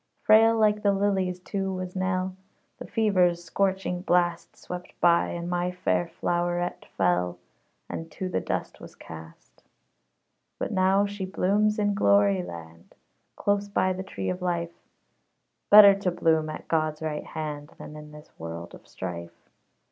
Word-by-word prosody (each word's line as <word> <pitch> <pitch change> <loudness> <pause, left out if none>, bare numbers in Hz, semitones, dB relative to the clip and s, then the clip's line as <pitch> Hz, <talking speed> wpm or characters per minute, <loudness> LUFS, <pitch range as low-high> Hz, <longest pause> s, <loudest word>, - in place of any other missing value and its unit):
Frail 225 +1 +6
like 210 -1 +3
the 200 -1 +3
lilies, 190 -2 0
too, 195 +1 -3
was 185 0 -5
Nell. 185 0 -1 0.4
The - - -8
fever's 180 -6 +2
scorching 190 0 -1
blast 175 -2 0
Swept 180 0 -9
by, 170 -1 +4
and 170 0 -5
my 175 0 -1
fair 180 -1 0
flowerette 175 +1 -2
fell, 90 -1 +1 0.5
And 165 0 -6
to 185 - -4
the 185 - -1
dust - - -4
was - - -12
cast. 80 0 -13 1.0
But - - -3
now 190 +1 +3
she 205 -1 -5
blooms 205 +3 +1
in 205 -1 +1
glory 100 - +3
land, 85 -1 -11 0.4
Close 205 0 0
by 185 -2 +1
the 185 - -5
tree 100 - -4
of 180 - -5
Life; 170 -1 -2 1.0
Better 205 -1 +10
to 195 -1 -1
bloom 160 -3 +1
at 155 - -8
God's 155 -1 -1
right 150 -1 -3
hand 150 -2 -6
Than 150 - -10
in 150 0 -10
this 150 0 -14
world 85 +1 -7
of - - -14
strife. 85 -2 -8
175 Hz, 150 wpm, -26 LUFS, 150-195 Hz, 1.0 s, Better